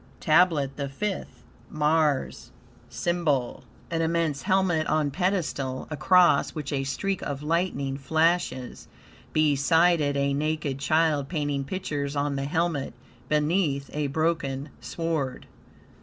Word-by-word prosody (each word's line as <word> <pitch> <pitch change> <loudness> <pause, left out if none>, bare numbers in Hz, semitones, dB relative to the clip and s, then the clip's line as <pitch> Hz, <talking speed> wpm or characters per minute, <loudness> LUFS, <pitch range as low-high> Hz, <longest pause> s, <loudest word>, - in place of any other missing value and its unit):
TABLET 155 -4 +3
THE 140 -1 -3
FIFTH 195 +8 -5 0.3
Mars 150 -2 0 0.4
SYMBOL 160 -8 -1 0.3
An 165 -1 0
immense 165 -3 0
helmet 185 -5 +1
on 150 -2 +1
pedestal, 155 -7 -1
across 170 0 +4
which 150 -2 -4
a 135 -1 0
streak 195 +8 -2
of 145 0 -4
lightning 150 -4 -1
flashes; 160 -3 0 0.4
beside 155 +3 +3
it 145 -1 0
a 140 0 +1
naked 150 -1 -1
child 155 -1 +1
painting 145 -4 -1
pictures 145 -3 -3
on 145 0 0
the 135 0 -2
helmet; 160 -2 -1 0.3
beneath, 150 -2 +1
a 150 -1 -1
broken 145 -2 -1
sword. 160 -6 -3
150 Hz, 115 wpm, -26 LUFS, 140-165 Hz, 0.4 s, across